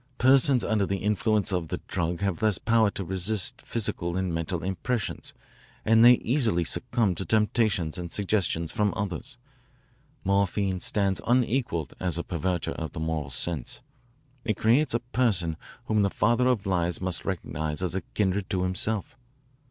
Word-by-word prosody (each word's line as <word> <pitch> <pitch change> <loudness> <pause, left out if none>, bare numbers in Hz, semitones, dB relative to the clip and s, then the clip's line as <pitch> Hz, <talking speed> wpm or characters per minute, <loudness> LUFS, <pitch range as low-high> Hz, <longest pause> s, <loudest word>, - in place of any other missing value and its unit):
Persons 130 -1 +4
under 105 -3 +1
the 100 - -1
influence 105 +1 +1
of 90 -3 -1
the - - -4
drug 85 0 -2
have 100 -4 -1
less 105 -4 +3
power 115 0 +3
to 100 - -5
resist 100 +7 -1
physical 90 -6 -2
and 95 -2 -1
mental 80 +1 -2
impressions 95 +5 -3 0.5
and 115 +1 +5
they 120 +1 +9
easily 115 - +1
succumb 115 +1 +1
to 90 - -4
temptations 105 -6 +1
and 85 -1 -6
suggestions 95 -5 0
from 105 -1 0
others. 110 +6 -4 0.9
Morphine 100 -1 +1
stands 95 -1 0
unequalled 120 - +1
as 90 -2 0
a 85 - -2
perverter 85 +1 -2
of 80 -3 -5
the - - -6
moral 80 -3 -2
sense. 70 +1 -3 0.6
It 110 -3 -1
creates 120 +4 +3
a 115 - 0
person 110 -10 +1 0.3
whom 110 -1 +2
the 100 - +2
father 120 +6 +2
of 125 -6 +1
lies 90 -3 0
must 90 -2 -1
recognise 80 -3 -2
as 90 0 +2 0.2
kindred 95 -2 0
to 90 -1 0
himself. 105 +8 -2
100 Hz, 155 wpm, -27 LUFS, 85-110 Hz, 0.9 s, they